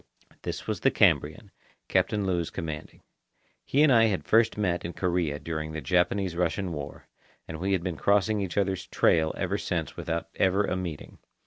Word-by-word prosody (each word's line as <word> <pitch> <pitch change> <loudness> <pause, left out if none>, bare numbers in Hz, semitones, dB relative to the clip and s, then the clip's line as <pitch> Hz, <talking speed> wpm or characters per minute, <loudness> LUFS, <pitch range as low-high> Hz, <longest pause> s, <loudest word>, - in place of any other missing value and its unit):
This - - -5
was - - -2
the - - +4
Cambrian, 80 +7 +2 0.4
Captain 105 -2 +1
Lewes 90 -3 0
commanding. 80 -2 -7 0.6
He 145 +3 +2
and 155 - +5
I 115 -1 +6
had 100 -4 -1
first 115 0 +3
met 90 -4 0
in 85 - -5
Korea 85 -5 0
during 80 0 -5
the 80 - -3
Japanese 90 +4 +1
Russian 90 +1 -1
War, 75 -1 -7 0.4
and 80 - -6
we 95 +3 0
had 90 -3 0
been 90 -3 -3
crossing 105 +3 +2
each 95 -1 -4
other's 95 -2 0
trail 80 -3 +3
ever - - -1
since - - -3
without 85 0 -3
ever 95 +2 +3
a - - -1
meeting. 85 -5 -6
90 Hz, 180 wpm, -27 LUFS, 80-100 Hz, 0.6 s, I